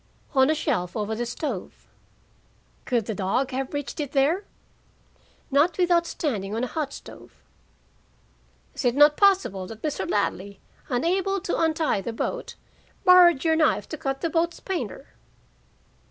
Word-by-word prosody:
"On 265 0 +4
a 315 - +3
shelf 225 - -2
over 215 +1 -2
the 240 +2 -3
stove." 245 - -5 1.0
"Could 235 -4 0
the 220 - -3
dog 205 +7 -1
have 260 0 -3
reached 290 0 -5
it 285 -2 -4
there?" 305 +9 +2 1.1
"Not 295 +5 +3
without 350 -2 +3
standing 215 - -3
on 230 - -2
a 255 - -4
hot 305 -4 -2
stove." - - -12 1.4
"Is - - -5
it 245 -1 +2
not 295 +1 +6
possible 375 - +2
that 225 +1 -11
Mr. 305 -2 -2
Ladley, 200 -1 -2 0.3
unable 370 +9 0
to 355 - -2
untie 315 - +1
the 230 +4 -5
boat, - - -4 0.5
borrowed 355 -5 +7
your 320 -1 +3
knife 315 -1 +2
to - - -4
cut 270 -1 -3
the 335 - -1
boat's 335 +1 0
painter?" 380 -2 -5
285 Hz, 150 wpm, -25 LUFS, 235-335 Hz, 1.4 s, borrowed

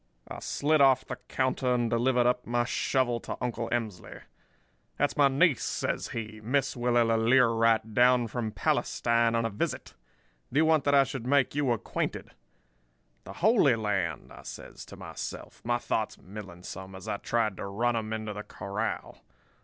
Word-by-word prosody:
"I - - -7
slid 150 +1 +1
off 135 -2 +5
the - - -6
counter 130 -1 0
and 120 -1 +1
delivered 120 +2 +2
up 125 0 +1
my 120 0 +1
shovel 120 0 0
to - - -6
Uncle 120 -2 -3
Emsley. 110 -6 -4 0.8
"'That's 145 - +1
my 145 -1 +5
niece,' 140 +1 +3
says - - -2
he; 110 -1 -6
'Miss 130 +4 0
Willella 120 -2 +2
Learight, 115 -2 +3
down 125 +1 +5
from 115 0 -3
Palestine 115 +3 +1
on 115 0 +1
a 115 - -1
visit. 100 - -3 0.6
Do 135 - -2
you 160 - +5
want 160 -2 +3
that 140 0 +4
I 140 - +7
should 130 -2 -6
make 140 -1 +3
you 145 -3 +1
acquainted?' 115 - -3 0.9
"'The 95 - -8
Holy 185 - +4
Land,' 105 -3 -2
I - - -12
says - - -9
to - - -10
myself, - - -7
my 120 +1 +1
thoughts 110 -2 -2
milling 95 -3 -10
some 95 +1 -8
as 95 - -10
I 100 - -1
tried 110 -3 0
to - - -5
run 115 +5 0
'em 110 -1 -3
into 110 -1 -3
the 105 - -6
corral. 105 +1 -5
120 Hz, 170 wpm, -28 LUFS, 110-130 Hz, 0.9 s, I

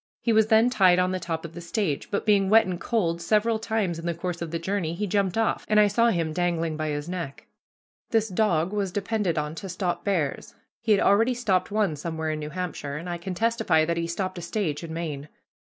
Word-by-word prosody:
He 230 - +1
was 220 0 +4
then 225 +2 +4
tied 185 -6 +5
on 180 0 +2
the 185 - -2
top 165 -1 -4
of 165 - -8
the 175 - -8
stage, 170 -4 -2
but, 200 - -2
being 200 -2 +3
wet 225 +2 +6
and 180 -1 -4
cold, 170 -8 0
several 220 +5 +2
times 215 -7 -1
in 165 - -5
the 170 - -1
course 170 0 -4
of 170 - -3
the 165 - -2
journey 170 -1 -2
he 210 +4 -2
jumped 200 -1 0
off, 225 - +1
and 215 0 +5
I 210 - +7
saw 230 +4 +3
him 165 -6 -1
dangling 165 -2 0
by 155 0 -2
his 145 +1 -3
neck. 170 -6 -5 0.6
This 225 -2 +2
dog 185 -3 +1
was 200 -3 -1
depended 200 -3 -1
on 150 0 -1
to 195 +3 -7
stop 175 -1 -2
bears. 170 -9 -2 0.2
He 225 - -1
had 205 - +5
already 225 +5 +4
stopped 195 -7 +1
one 205 -6 +1
somewhere 160 +1 -3
in 155 - -3
New 150 0 -5
Hampshire, 155 -4 -4
and 165 +4 -7
I 175 -1 -4
can 185 +1 -5
testify 225 -6 +2
that 170 +1 0
he 170 0 -1
stopped 185 +1 -3
a - - -7
stage 170 -3 -2
in 165 - -6
Maine. 155 -3 -5
180 Hz, 235 wpm, -26 LUFS, 165-210 Hz, 0.6 s, I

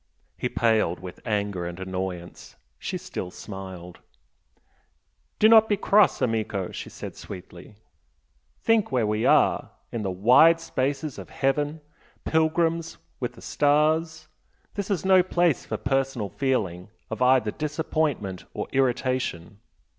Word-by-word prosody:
He - - -2
paled 110 -7 +1
with 90 -2 -9
anger 100 -5 -1
and 85 +1 -7
annoyance, 95 -2 -6 0.2
she 185 - -3
still 180 - -6
smiled. 95 -3 -9 1.4
"Do 215 - +6
not 220 0 +7
be 205 - +2
cross, 205 0 +3
AMICO!" 110 -5 -1
she - - -7
said, - - -8
sweetly. 90 +1 -10 0.9
"Think 225 -2 +2
where 125 -4 +2
we 105 +1 0
are! - - +3 0.2
in 115 - -3
the 100 - -2
wide 125 - +5
spaces 145 -1 -2
of - - -10
heaven, 145 +3 -1 0.4
pilgrims 165 +1 +1 0.2
with - - -3
the - - -15
stars! 155 +2 +1 0.5
This 200 0 -4
is 190 -3 -1
no 190 -1 +6
place 175 -4 +1
for - - -3
personal 135 -5 -1
feeling 100 -10 -1 0.2
of 110 +2 -4
either 125 -4 +4
disappointment 150 - -2
or - - -3
irritation. 130 -8 -1
130 Hz, 130 wpm, -25 LUFS, 100-160 Hz, 1.4 s, not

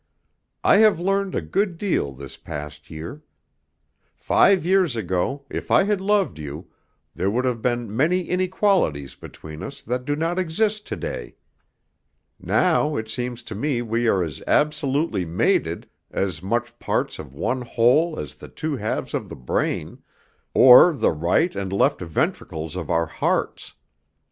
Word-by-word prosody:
I - - +6
have 215 -5 +5
learned 195 +1 0
a - - -1
good 195 -4 -1
deal 170 - 0
this 70 0 -10
past 75 +1 -8
year. 80 - -8 0.9
Five 195 -5 +3
years 185 -7 +3
ago, 110 +7 -2
if - - -6
I - - +5
had 205 -1 0
loved 200 - +1
you, 75 -1 -8 0.4
there 95 +3 -1
would 125 +5 0
have 120 -3 -1
been 120 -3 -1
many 165 +9 +2
inequalities 180 - 0
between 80 0 -11
us 140 - -7
that 125 +2 -2
do 145 +3 -1
not 165 +4 -1
exist 210 +5 -1
to - - -3
day. - - -6 1.0
Now 155 -4 +2
it 110 0 -4
seems 120 +1 -4
to 110 - -7
me 120 +2 -1
we 115 +1 0
are 95 -4 +3
as 80 -4 -6
absolutely 145 - +1
mated, 85 +1 0 0.2
as 90 -5 -2
much 120 +5 -2
parts - - -2
of 65 - -10
one 125 - -1
whole 125 +8 +2
as - - -6
the - - -12
two 155 -3 -3
halves 110 -1 -3
of - - -3
the - - -7
brain, 60 - -2 0.5
or 130 +7 +9
the 145 - +1
right 85 - +1
and 95 -1 -3
left 100 - +2
ventricles 80 -1 -2
of 85 -4 -5
our 85 0 +2
hearts. - - -2
125 Hz, 155 wpm, -23 LUFS, -, 1.0 s, or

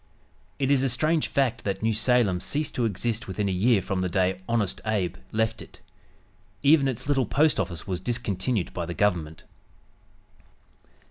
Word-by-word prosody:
It 135 0 0
is 140 -2 +4
a 135 - +2
strange 155 +6 +1
fact 125 -4 0
that 100 +1 -3
New 110 0 +2
Salem 110 -4 +2
ceased 150 +10 -2
to 120 - 0
exist 110 +1 -2
within 100 +2 -2
a - - 0
year 100 +3 +2
from 95 -1 -2
the 90 - -1
day 95 0 0
"Honest 115 -5 0
Abe" 95 -5 -1
left 110 +1 0
it. - - -13 0.8
Even 145 -1 +5
its 130 0 -4
little 135 -5 +1
post 155 +5 +2
office 85 -3 -3
was 90 -2 -3
discontinued 110 -1 -1
by 85 -2 -4
the 85 - -5
Government. 85 -6 0
110 Hz, 170 wpm, -26 LUFS, 95-125 Hz, 0.8 s, Even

